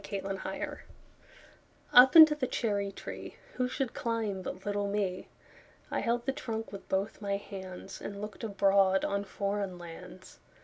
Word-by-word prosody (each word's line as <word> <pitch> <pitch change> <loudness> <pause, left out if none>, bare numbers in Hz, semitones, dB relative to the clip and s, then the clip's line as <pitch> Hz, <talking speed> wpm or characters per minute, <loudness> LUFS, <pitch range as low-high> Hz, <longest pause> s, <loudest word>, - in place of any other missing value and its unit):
Foreign 195 -1 -4
Lands - - -4 1.2
UP 255 +4 +9
into 315 -2 +11
the 290 -4 -2
cherry 205 -5 -1
treeWho 250 +5 -6
should 260 -1 -2
climb 225 -5 -2
but 185 +1 -7
little 205 0 -1
me?I 200 -3 -5
held 235 +1 0
the 270 - +1
trunk 225 -5 -5
with 200 - -10
both 195 +3 -1
my 200 -1 -1
handsAnd 195 0 -8
looked 210 +2 -7
abroad 195 -2 +3
on 200 0 -1
foreign 200 -2 -3
lands. 175 +2 -11
200 Hz, 135 wpm, -31 LUFS, 195-230 Hz, 1.2 s, into